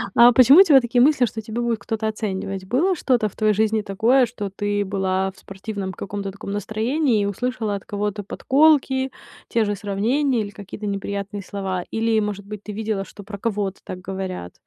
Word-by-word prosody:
А 240 Hz, +1 st, +8 dB
почему 255 Hz, +6 st, +7 dB
у -, -, +11 dB
тебя 285 Hz, -8 st, +6 dB
такие 240 Hz, +1 st, +1 dB
мысли, 270 Hz, -1 st, +5 dB
что 225 Hz, -1 st, -5 dB
тебя 220 Hz, +2 st, -4 dB
будет 235 Hz, -2 st, 0 dB
кто-то 220 Hz, +1 st, -3 dB
оценивать? 195 Hz, -3 st, -4 dB
Было 300 Hz, -, +1 dB
что-то 245 Hz, -8 st, +1 dB
в -, -, -22 dB
твоей 215 Hz, -1 st, +2 dB
жизни 220 Hz, +1 st, +1 dB
такое, 225 Hz, +7 st, +3 dB
что 210 Hz, -4 st, -5 dB
ты 205 Hz, +1 st, -1 dB
была 190 Hz, -1 st, -1 dB
в 190 Hz, -, -27 dB
спортивном 195 Hz, -1 st, -6 dB
каком-то 200 Hz, +1 st, -5 dB
таком 200 Hz, 0 st, -8 dB
настроении 220 Hz, -, 0 dB
и -, -, 0 dB
услышала 220 Hz, +1 st, -2 dB
от 200 Hz, -, -7 dB
кого-то 205 Hz, 0 st, -3 dB
подколки, 265 Hz, +2 st, +2 dB, 0.4 s
те 230 Hz, -2 st, +2 dB
же 205 Hz, 0 st, -1 dB
сравнения 225 Hz, +7 st, 0 dB
или 205 Hz, -, -4 dB
какие-то 205 Hz, +1 st, -9 dB
неприятные 200 Hz, 0 st, -4 dB
слова? 190 Hz, -2 st, -3 dB
Или, 225 Hz, 0 st, +1 dB
может 205 Hz, -2 st, -3 dB
быть, 210 Hz, 0 st, -8 dB
ты 210 Hz, -, -7 dB
видела, 210 Hz, -2 st, -2 dB
что 205 Hz, -, -12 dB
про 200 Hz, 0 st, -8 dB
кого-то 200 Hz, -2 st, -2 dB
так 185 Hz, -, -7 dB
говорят? 185 Hz, -, -5 dB
210 Hz, 190 wpm, -22 LUFS, 200-235 Hz, 0.4 s, у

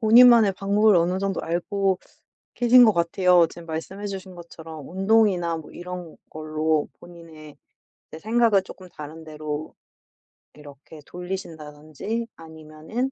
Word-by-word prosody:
본인만의 230 Hz, -2 st, +7 dB
방법을 205 Hz, +1 st, +3 dB
어느 175 Hz, +2 st, +1 dB
정도 195 Hz, 0 st, -2 dB
알고 190 Hz, +3 st, -1 dB, 0.6 s
계신 245 Hz, +1 st, +6 dB
것 220 Hz, -, +5 dB
같아요. 175 Hz, 0 st, +3 dB
지금 170 Hz, -1 st, -12 dB
말씀해 190 Hz, +6 st, -6 dB
주신 190 Hz, -2 st, -7 dB
것처럼 160 Hz, -3 st, -11 dB
운동이나 190 Hz, -3 st, +2 dB
뭐 160 Hz, -, -10 dB
이런 180 Hz, -2 st, -8 dB
걸로 155 Hz, 0 st, -1 dB
본인의 160 Hz, -3 st, -14 dB, 0.5 s
이제 160 Hz, -, -10 dB
생각을 220 Hz, -1 st, +2 dB
쪼끔 185 Hz, -1 st, -13 dB
다른 155 Hz, 0 st, -10 dB
데로 155 Hz, 0 st, -6 dB, 0.8 s
이렇게 150 Hz, +1 st, -14 dB
돌리신다든지 170 Hz, -, -6 dB
아니면은 160 Hz, +10 st, -6 dB
175 Hz, 295 characters per minute, -24 LUFS, 155-200 Hz, 0.8 s, 본인만의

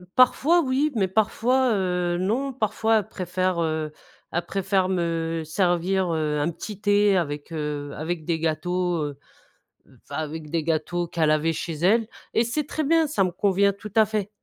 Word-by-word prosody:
Parfois 295 Hz, +7 st, +5 dB
oui, 280 Hz, +2 st, +1 dB
mais 195 Hz, -3 st, +2 dB
parfois, 230 Hz, +5 st, +2 dB
heu, 180 Hz, -2 st, 0 dB
non. 230 Hz, +10 st, 0 dB
Parfois, 220 Hz, -1 st, +1 dB
elle 205 Hz, -, -6 dB
préfère, 185 Hz, -2 st, -1 dB
heu, 155 Hz, -1 st, -1 dB, 0.4 s
elle 175 Hz, -, -1 dB
préfère 195 Hz, -1 st, 0 dB
me 165 Hz, -2 st, -1 dB
servir, 180 Hz, +2 st, +1 dB
heu, 150 Hz, -2 st, 0 dB
un 150 Hz, +3 st, +1 dB
petit 205 Hz, +4 st, -7 dB
thé 205 Hz, -1 st, +4 dB
avec, 145 Hz, -3 st, -2 dB
heu, 150 Hz, -2 st, -4 dB
avec 160 Hz, +1 st, -4 dB
des 165 Hz, -1 st, 0 dB
gâteaux, 175 Hz, +1 st, 0 dB
heu, 145 Hz, -2 st, -5 dB, 0.9 s
enfin, -, -, -9 dB
avec 155 Hz, 0 st, -5 dB
des 165 Hz, 0 st, -1 dB
gâteaux 165 Hz, +2 st, -1 dB
qu'elle 165 Hz, -2 st, +1 dB
avait 155 Hz, +2 st, +2 dB
chez 165 Hz, +1 st, -4 dB
elle 205 Hz, +8 st, +2 dB, 0.3 s
et 230 Hz, -, +3 dB
c'est 300 Hz, +6 st, -1 dB
très 310 Hz, 0 st, -3 dB
bien, 325 Hz, +2 st, +4 dB
ça 240 Hz, -10 st, +1 dB
me 180 Hz, -, -2 dB
convient 200 Hz, +2 st, +2 dB
tout 210 Hz, +1 st, -10 dB
à 220 Hz, -1 st, +6 dB
fait. 210 Hz, -2 st, -2 dB
180 Hz, 175 wpm, -24 LUFS, 160-210 Hz, 0.9 s, à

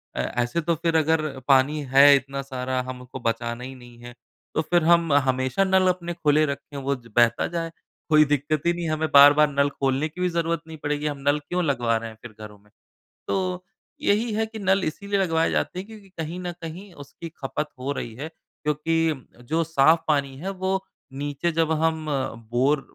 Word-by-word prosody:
अ, -, -, -4 dB
ऐसे 120 Hz, -, -1 dB
तो 165 Hz, +1 st, 0 dB
फ़िर 165 Hz, +1 st, -1 dB
अगर 160 Hz, 0 st, +2 dB, 0.3 s
पानी 140 Hz, +2 st, +4 dB
है 140 Hz, +1 st, +8 dB
इतना 135 Hz, 0 st, -3 dB
सारा 130 Hz, -1 st, -3 dB
हमको 125 Hz, 0 st, -8 dB
बचाना 115 Hz, +1 st, -2 dB
ही 130 Hz, +1 st, -7 dB
नहीं 120 Hz, -1 st, -15 dB
है। 120 Hz, 0 st, -11 dB, 0.4 s
तो 160 Hz, -, +2 dB
फ़िर 175 Hz, +1 st, +1 dB
हम 170 Hz, -1 st, +4 dB
हमेशा 130 Hz, +4 st, +2 dB
नल 190 Hz, -1 st, +3 dB
अपने 175 Hz, -1 st, -1 dB
खुले 155 Hz, -2 st, +2 dB
रखें 140 Hz, 0 st, -6 dB
वो 140 Hz, 0 st, -1 dB
बहता 115 Hz, +1 st, +2 dB
जाए। 165 Hz, -1 st, -4 dB, 0.4 s
कोई 155 Hz, -1 st, +6 dB
दिक़्क़त 145 Hz, +1 st, -1 dB
ही 170 Hz, -, +3 dB
नहीं 175 Hz, 0 st, -4 dB
है। 160 Hz, -, -1 dB
हमें 155 Hz, 0 st, -1 dB
बार-बार 145 Hz, +1 st, +8 dB
नल 140 Hz, 0 st, +2 dB
खोलने 135 Hz, +1 st, -1 dB
की 175 Hz, +4 st, -9 dB
भी 180 Hz, -, +2 dB
जरूरत 170 Hz, -1 st, -1 dB
नहीं 160 Hz, 0 st, -9 dB
पड़ेगी, 145 Hz, 0 st, -3 dB
हम 145 Hz, -1 st, -3 dB
नल 145 Hz, +1 st, +3 dB
क्यों 180 Hz, +5 st, -2 dB
लगवा 120 Hz, -6 st, +1 dB
रहे 115 Hz, 0 st, -6 dB
हैं 110 Hz, -, -12 dB
फ़िर 120 Hz, -, -10 dB
घरों 105 Hz, -1 st, -10 dB
में। 105 Hz, +1 st, -26 dB, 0.6 s
तो 185 Hz, -1 st, -2 dB, 0.4 s
यही 220 Hz, +3 st, +1 dB
है 220 Hz, +1 st, 0 dB
कि 220 Hz, 0 st, -9 dB
नल 195 Hz, -1 st, +2 dB
इसीलिए 200 Hz, +5 st, -2 dB
लगवाए 165 Hz, -4 st, +1 dB
जाते 180 Hz, -, -1 dB
हैं 190 Hz, -, -6 dB
क्योंकि 215 Hz, -3 st, -13 dB
कहीं 170 Hz, -1 st, -6 dB
न 180 Hz, -1 st, -4 dB
कहीं 175 Hz, +5 st, -8 dB
उसकी 165 Hz, +2 st, -10 dB
ख़पत 150 Hz, +3 st, -2 dB
हो 130 Hz, +2 st, -3 dB
रही 120 Hz, -4 st, -5 dB
है 140 Hz, +6 st, -6 dB
क्योंकि 155 Hz, -2 st, -2 dB, 0.2 s
जो 165 Hz, +1 st, +2 dB
साफ़ 160 Hz, 0 st, +4 dB
पानी 140 Hz, -3 st, 0 dB
है 180 Hz, +7 st, -5 dB
वो 190 Hz, 0 st, +1 dB, 0.3 s
नीचे 145 Hz, +4 st, -2 dB
जब 165 Hz, -1 st, +1 dB
हम 160 Hz, -1 st, 0 dB, 0.5 s
बोर 135 Hz, +4 st, +2 dB
150 Hz, 200 wpm, -24 LUFS, 135-170 Hz, 0.6 s, है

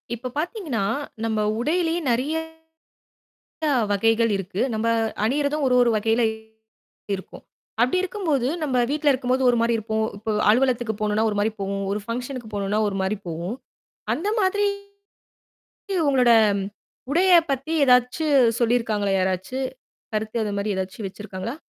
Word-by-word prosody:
இப்போ 245 Hz, +2 st, -6 dB
பார்த்தீங்கன்னா, 320 Hz, -, -2 dB, 0.4 s
நம்ம 220 Hz, -1 st, 0 dB, 0.2 s
உடையிலேயே 330 Hz, +5 st, 0 dB
நெறையா 280 Hz, +7 st, 0 dB, 1.5 s
வகைகள் 225 Hz, +2 st, +2 dB
இருக்கு. 195 Hz, +1 st, -4 dB
நம்ப 220 Hz, +1 st, 0 dB, 0.4 s
அணியிரதும் 285 Hz, +4 st, 0 dB
ஒரு 255 Hz, -, +3 dB
ஒரு 240 Hz, -, +3 dB
வகையிலயும் 220 Hz, 0 st, 0 dB, 0.7 s
இருக்கும். 190 Hz, -, -12 dB, 0.4 s
அப்டி 250 Hz, +8 st, +2 dB
இருக்கும்போது 330 Hz, -, -1 dB
நம்ம 260 Hz, -5 st, +1 dB
வீட்ல 295 Hz, 0 st, +2 dB
இருக்கும்போது 255 Hz, 0 st, 0 dB
ஒரு 240 Hz, -, +1 dB
மாரி 230 Hz, 0 st, +2 dB
இருப்போம். 220 Hz, 0 st, -1 dB
இப்போ 220 Hz, +2 st, -3 dB, 0.2 s
அலுவலகத்துக்கு 240 Hz, -2 st, +2 dB
போணுனா 210 Hz, 0 st, +1 dB
ஒரு 205 Hz, -, -3 dB
மாரி 210 Hz, +2 st, +2 dB
போவோம். 195 Hz, 0 st, -2 dB
ஒரு 210 Hz, -, -2 dB
பங்ஷன்க்கு 245 Hz, 0 st, -4 dB
போணுனா 200 Hz, +1 st, -1 dB
ஒரு 195 Hz, -, -3 dB
மாரி 190 Hz, +3 st, 0 dB
போவோம். 170 Hz, +7 st, -4 dB, 0.6 s
அந்த 390 Hz, +6 st, -2 dB
மாதிரி, 410 Hz, +1 st, +2 dB, 1.4 s
உங்களோட 250 Hz, -3 st, +4 dB, 0.8 s
உடையப் 345 Hz, 0 st, +5 dB
பத்தி 275 Hz, +4 st, -2 dB
ஏதாச்சு 250 Hz, +4 st, +3 dB, 0.3 s
சொல்லிருக்காங்களா? 225 Hz, -4 st, +1 dB
யாராச்சு 185 Hz, +6 st, -1 dB, 0.6 s
கருத்து 215 Hz, +1 st, -2 dB
அது 210 Hz, -1 st, -3 dB
மாரி 200 Hz, +1 st, -1 dB
ஏதாச்சு 190 Hz, +1 st, -4 dB
வச்சுருக்காங்களா? 200 Hz, +4 st, -6 dB
235 Hz, 125 wpm, -23 LUFS, 210-275 Hz, 1.5 s, உடையப்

